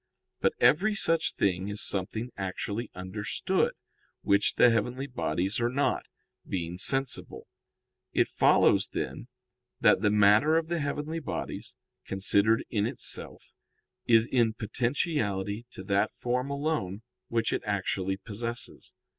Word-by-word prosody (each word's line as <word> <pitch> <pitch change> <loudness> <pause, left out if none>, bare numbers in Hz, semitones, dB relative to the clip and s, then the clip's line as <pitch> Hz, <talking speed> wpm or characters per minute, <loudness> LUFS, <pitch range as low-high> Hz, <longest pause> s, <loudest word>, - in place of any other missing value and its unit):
But - - +2
every 205 +7 +4
such 165 -5 +2
thing 95 -1 0
is 105 0 -4
something 110 +5 -1
actually 100 +4 -4
understood, 95 +3 -1 0.5
which 100 +1 +2
the 120 - +6
heavenly 125 +4 -1
bodies 100 -6 -1
are 120 0 +1
not, 140 +3 0 0.4
being 90 -1 -4
sensible. 135 +4 -1 0.7
It - - +2
follows, - - +4
then, - - -4 0.5
that - - +5
the 105 - +3
matter 105 +9 +5
of 165 0 -1
the 170 -1 0
heavenly 150 +2 -3
bodies, 160 - -5 0.3
considered 100 +4 +2
in 105 -3 +1
itself, - - -3 0.5
is 115 -1 +6
in 120 -3 +2
potentiality 115 - -1
to 95 - -9
that 100 +1 0
form 125 +2 -1
alone 140 - -2 0.2
which 115 -1 0
it - - -1
actually 95 -2 -1
possesses. 115 +3 -6
115 Hz, 125 wpm, -28 LUFS, 100-135 Hz, 0.7 s, the